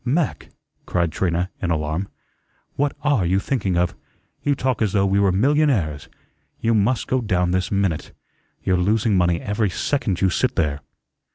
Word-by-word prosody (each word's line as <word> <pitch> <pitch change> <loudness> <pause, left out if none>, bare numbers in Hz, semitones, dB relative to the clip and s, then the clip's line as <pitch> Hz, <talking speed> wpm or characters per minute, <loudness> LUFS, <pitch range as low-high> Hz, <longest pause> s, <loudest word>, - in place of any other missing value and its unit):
"Mac," 145 +6 -1 0.4
cried 85 -2 0
Trina, 90 +1 -1
in 90 - -1
alarm, 80 +3 -1 0.7
"what 145 0 0
are 145 -9 +2
you 90 +2 +2
thinking 100 -4 -1
of? 90 0 +1 0.5
You 145 -1 +1
talk 130 -2 -1
as 105 -3 +1
though 100 -2 +3
we 100 +1 +2
were 100 -1 +3
millionaires. 105 - +1 0.5
You 115 - +1
must 110 +3 +2
go 130 0 0
down 90 -5 +1
this 95 0 0
minute. 95 -6 -1 0.5
You're 95 -1 +2
losing 105 +3 +2
money 90 -2 +2
every 105 0 -1
second 105 -1 -1
you 95 -1 +2
sit 130 +6 0
there." 70 -3 0
100 Hz, 165 wpm, -22 LUFS, 90-120 Hz, 0.7 s, though